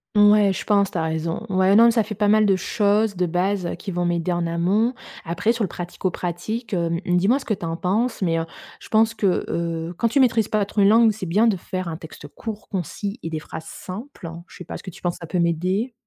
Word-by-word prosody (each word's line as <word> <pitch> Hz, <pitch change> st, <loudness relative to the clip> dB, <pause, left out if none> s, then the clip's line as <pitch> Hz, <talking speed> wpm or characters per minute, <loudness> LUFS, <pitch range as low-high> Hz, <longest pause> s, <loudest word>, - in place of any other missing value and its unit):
Ouais, 205 Hz, -1 st, +6 dB
je -, -, -4 dB
pense. 200 Hz, -2 st, +2 dB
Tu -, -, -4 dB
as -, -, 0 dB
raison. 160 Hz, +1 st, -2 dB
Ouais, 190 Hz, 0 st, +3 dB
mais 200 Hz, -, +5 dB
non, 230 Hz, +2 st, +8 dB
ça 230 Hz, -1 st, +2 dB
fait 215 Hz, +1 st, -6 dB
pas 210 Hz, 0 st, +1 dB
mal 215 Hz, +1 st, +5 dB
de 195 Hz, -2 st, +4 dB
choses 205 Hz, +2 st, +1 dB
de 180 Hz, 0 st, +1 dB
base 180 Hz, +2 st, 0 dB
qui 205 Hz, -, -7 dB
vont 175 Hz, -1 st, -1 dB
m'aider 175 Hz, 0 st, 0 dB
en 175 Hz, -1 st, 0 dB
amont. 185 Hz, +8 st, +1 dB, 0.3 s
Après 175 Hz, +6 st, 0 dB
sur 230 Hz, -2 st, -2 dB
le -, -, +1 dB
pratico-pratique, 180 Hz, +5 st, -4 dB
heu, 170 Hz, -1 st, 0 dB
mmh, 180 Hz, 0 st, +1 dB
dis-moi 210 Hz, +10 st, +3 dB
ce -, -, -11 dB
que 215 Hz, -, 0 dB
tu 175 Hz, -, -7 dB
en 165 Hz, 0 st, -2 dB
penses 220 Hz, +8 st, 0 dB
mais 165 Hz, -3 st, +1 dB
heu, 165 Hz, -, -1 dB, 0.3 s
je -, -, -14 dB
pense 225 Hz, +1 st, +3 dB
que, 195 Hz, -5 st, +1 dB
heu, 170 Hz, 0 st, -3 dB
quand 230 Hz, -, +1 dB
tu 280 Hz, -, +2 dB
maîtrises 230 Hz, -5 st, +3 dB
pas 215 Hz, -1 st, +1 dB
trop 205 Hz, -, 0 dB
une 195 Hz, -, +6 dB
langue, 225 Hz, +1 st, +6 dB
c'est 210 Hz, -2 st, -6 dB
bien 205 Hz, +7 st, +3 dB
de 210 Hz, -4 st, +2 dB
faire 185 Hz, +1 st, -5 dB
un 160 Hz, -1 st, -4 dB
texte 160 Hz, -2 st, -11 dB
court, 215 Hz, +7 st, -8 dB
concis 200 Hz, -, -4 dB
et 165 Hz, -, -4 dB
des 155 Hz, -, -2 dB
phrases 160 Hz, +1 st, -8 dB
simples. 195 Hz, -, -8 dB, 0.2 s
Je -, -, -14 dB
sais 180 Hz, -, -9 dB
pas -, -, -6 dB
ce -, -, -13 dB
que 185 Hz, -, -7 dB
tu -, -, -15 dB
penses. 175 Hz, -1 st, -2 dB
Ça 170 Hz, -, -7 dB
peut 180 Hz, +2 st, -2 dB
m'aider? 180 Hz, +8 st, 0 dB
190 Hz, 260 wpm, -23 LUFS, 175-215 Hz, 0.3 s, non